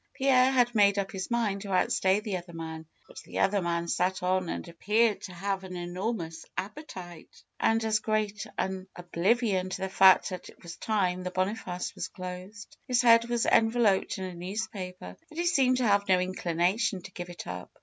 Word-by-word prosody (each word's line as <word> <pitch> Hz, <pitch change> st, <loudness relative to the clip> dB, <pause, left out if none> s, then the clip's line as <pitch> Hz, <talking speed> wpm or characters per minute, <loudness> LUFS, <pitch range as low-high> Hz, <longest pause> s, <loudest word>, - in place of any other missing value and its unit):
Pierre 260 Hz, -1 st, +4 dB
had 245 Hz, -2 st, +3 dB
made 205 Hz, -2 st, +4 dB
up 195 Hz, -1 st, -1 dB
his 190 Hz, -1 st, -5 dB
mind 220 Hz, -5 st, 0 dB
to 200 Hz, -1 st, -6 dB
outstay 190 Hz, +1 st, +2 dB
the 210 Hz, -4 st, -2 dB
other 175 Hz, -1 st, -10 dB
man. 160 Hz, -1 st, -7 dB, 0.2 s
But -, -, -11 dB
the -, -, -9 dB
other 195 Hz, 0 st, +2 dB
man 170 Hz, -1 st, -1 dB
sat 185 Hz, +2 st, 0 dB
on 185 Hz, -1 st, +1 dB
and -, -, -4 dB
appeared 210 Hz, +6 st, +1 dB
to 190 Hz, -, -7 dB
have 195 Hz, +2 st, -3 dB
an 185 Hz, -1 st, -7 dB
enormous 175 Hz, -1 st, -4 dB
appetite, 185 Hz, -, -8 dB, 0.2 s
and 225 Hz, 0 st, +2 dB
as 215 Hz, -1 st, +2 dB
great 215 Hz, -1 st, -1 dB
an 190 Hz, 0 st, -2 dB
oblivion 185 Hz, +2 st, 0 dB
to 185 Hz, -, -5 dB
the 190 Hz, -, -2 dB
fact 190 Hz, 0 st, +6 dB
that 185 Hz, -2 st, -7 dB
it -, -, -18 dB
was 170 Hz, -1 st, -8 dB
time 185 Hz, -4 st, 0 dB
the 180 Hz, -, -3 dB
Boniface 185 Hz, -1 st, -2 dB
was -, -, -4 dB
closed. 185 Hz, +3 st, -9 dB
His 250 Hz, -1 st, +2 dB
head 230 Hz, 0 st, +6 dB
was 240 Hz, -1 st, +1 dB
enveloped 225 Hz, -3 st, +3 dB
in 190 Hz, -, -5 dB
a 185 Hz, -1 st, -5 dB
news 185 Hz, +5 st, -3 dB
paper, 180 Hz, -, -8 dB
and 310 Hz, -, -8 dB
he 345 Hz, -, 0 dB
seemed 265 Hz, -7 st, +3 dB
to 250 Hz, -2 st, +1 dB
have 200 Hz, 0 st, +3 dB
no 185 Hz, -1 st, +5 dB
inclination 185 Hz, +2 st, 0 dB
to -, -, -10 dB
give 175 Hz, -1 st, -7 dB
it 175 Hz, -, -8 dB
up. 90 Hz, 0 st, -7 dB
190 Hz, 200 wpm, -29 LUFS, 180-220 Hz, 0.2 s, fact